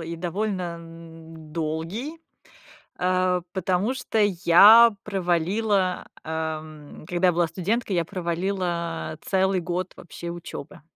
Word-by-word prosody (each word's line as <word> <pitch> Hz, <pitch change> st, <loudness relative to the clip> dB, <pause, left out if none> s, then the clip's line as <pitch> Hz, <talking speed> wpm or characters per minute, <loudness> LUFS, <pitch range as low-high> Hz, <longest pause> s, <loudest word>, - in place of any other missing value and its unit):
и 165 Hz, +1 st, -5 dB
довольно, 185 Hz, +3 st, -2 dB, 0.2 s
м, 165 Hz, -1 st, -13 dB
долгий, 165 Hz, -, -4 dB, 0.8 s
а, 185 Hz, 0 st, +1 dB
потому 190 Hz, +5 st, 0 dB
что 250 Hz, -4 st, -2 dB
я 205 Hz, +4 st, +7 dB
провалила, 190 Hz, +1 st, 0 dB, 0.2 s
ам, 155 Hz, -2 st, -6 dB
когда 180 Hz, 0 st, +2 dB
я 180 Hz, -, +3 dB
была 170 Hz, 0 st, +2 dB
студенткой, 195 Hz, +3 st, -1 dB
я 170 Hz, -, +1 dB
провалила 170 Hz, -3 st, -3 dB
целый 190 Hz, 0 st, +1 dB
год 180 Hz, +1 st, -3 dB
вообще 170 Hz, 0 st, -8 dB
учёбы. 175 Hz, +1 st, -9 dB
180 Hz, 110 wpm, -25 LUFS, 165-195 Hz, 0.8 s, я